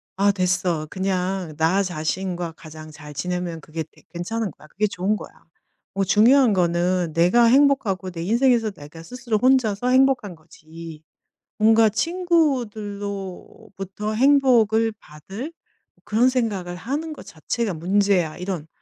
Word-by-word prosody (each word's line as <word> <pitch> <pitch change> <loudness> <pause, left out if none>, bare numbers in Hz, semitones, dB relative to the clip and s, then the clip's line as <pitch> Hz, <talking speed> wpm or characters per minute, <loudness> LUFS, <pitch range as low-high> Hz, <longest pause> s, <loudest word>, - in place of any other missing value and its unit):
'아 200 +1 +3
됐어. 180 -4 -1
그냥 185 -3 -2
나 170 +5 +2
자신과 175 0 -3
가장 155 -1 -12
잘 150 0 -11
지내면 175 +2 -3
그게 160 +1 -6
되 - - -22
괜찮은 205 +5 -3
거야. 155 - -18
그게 210 +5 0
좋은 200 +2 -1
거야. - - -9 0.6
뭐 195 0 0
중요한 225 +4 +5
거는 175 -1 +1
내가 180 +9 +4
행복하고 235 -8 +2
내 165 -2 -6
인생에서 235 +1 +2
내가 155 -1 -12
스스로 240 0 -3
혼자서 245 -2 +2
행복한 255 -7 +2
거지, 160 0 -12 0.5
뭔가 220 +1 +5
친구들로부터 210 - -2
행복을 230 -4 +3
받을 195 - -9 0.5
그런 225 +4 +3
생각을 205 -8 -2
하는 290 - -4
것 - - -12
자체가 200 +6 -3
문제야.' 185 -1 +1
이런 180 -4 -5
195 Hz, 280 characters per minute, -22 LUFS, 175-230 Hz, 0.6 s, 중요한